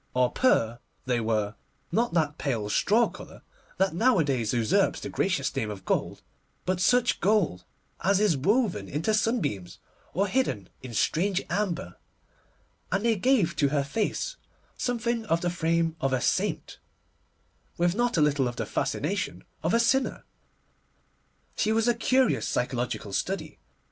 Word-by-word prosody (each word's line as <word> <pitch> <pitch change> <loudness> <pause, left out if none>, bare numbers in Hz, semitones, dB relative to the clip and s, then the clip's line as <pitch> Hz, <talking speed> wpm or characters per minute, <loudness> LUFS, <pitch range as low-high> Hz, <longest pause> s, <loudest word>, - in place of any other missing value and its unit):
Or 125 -1 +3
pur 120 - +2 0.3
they 125 -2 +1
were—not 110 - -2
that 155 -2 +1
pale 115 -7 -2
straw 225 - +3
colour - - -12 0.3
that 190 -2 +2
nowadays 155 - +2
usurps 115 -3 +2
the - - -6
gracious - - -1
name 105 - -1
of 100 -2 -8
gold, - - -1 0.4
but 180 0 0
such 245 +5 +3
gold 175 - +1 0.4
as 195 +1 +3
is 210 -6 +3
woven 190 - +1
into 160 +9 0
sunbeams 195 - -1 0.4
or 195 +3 +2
hidden 140 - -1
in 125 -3 -8
strange 185 - +1
amber; 175 - -2 0.9
and 195 +4 0
they 230 -1 +3
gave 210 -5 +2
to 145 - +3
her 140 -1 +1
face 220 - -2 0.4
something 235 -1 -1
of 170 -3 +1
the 175 - 0
frame 165 -1 0
of 135 0 +1
a 130 - +2
saint, - - -1 1.0
with 175 0 +2
not 240 +2 0
a - - +4
little 145 -3 +2
of 120 - -4
the - - -3
fascination 90 - -2 0.2
of 165 - 0
a 230 - +3
sinner. 265 +3 +1 1.3
She 215 - +1
was 225 +1 +2
a 240 - +5
curious 255 +2 +2
psychological 120 -4 -2
study. 155 - -3
170 Hz, 145 wpm, -27 LUFS, -, 1.3 s, a